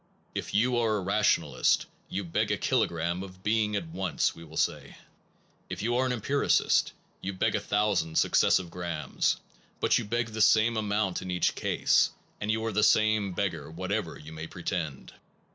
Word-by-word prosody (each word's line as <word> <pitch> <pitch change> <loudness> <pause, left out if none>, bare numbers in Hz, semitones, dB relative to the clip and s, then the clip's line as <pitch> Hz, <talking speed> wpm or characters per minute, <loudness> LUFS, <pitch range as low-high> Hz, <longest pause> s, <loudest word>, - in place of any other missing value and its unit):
If - - -4
you 120 +3 +3
are 110 -2 +2
a - - -2
rationalist 100 +3 +2
a11 - - -20 0.2
you 100 - -3
beg 85 - -1
a - - +1
kilogram 85 +2 0
of 95 -1 -10
being 105 -1 +1
at 100 - -2
once, 90 +1 -1
we 85 - -12
will 80 0 -11
say; 75 -5 -1 0.7
if - - -5
you 120 +2 +1
are 130 +1 +2
an - - -1
empiricist 130 +4 +2 0.3
you 100 - -3
beg 95 - 0
a - - +1
thousand 100 -6 0
successive 90 -3 +3
grams; 85 -3 -1 0.4
but - - +3
you - - -4
beg 115 +2 -1
the 110 0 -3
same 110 +2 +5
amount 105 -3 0
in 95 - -7
each 90 -1 +1
case, - - +2 0.3
and 105 - -4
you 110 +1 0
are 115 - -1
the 105 +1 +1
same 110 -2 +3
beggar 80 -7 -2
whatever 95 +2 -3
you 80 +1 -11
may 80 +1 -6
pretend. 80 -5 -4
100 Hz, 180 wpm, -28 LUFS, 85-110 Hz, 0.7 s, same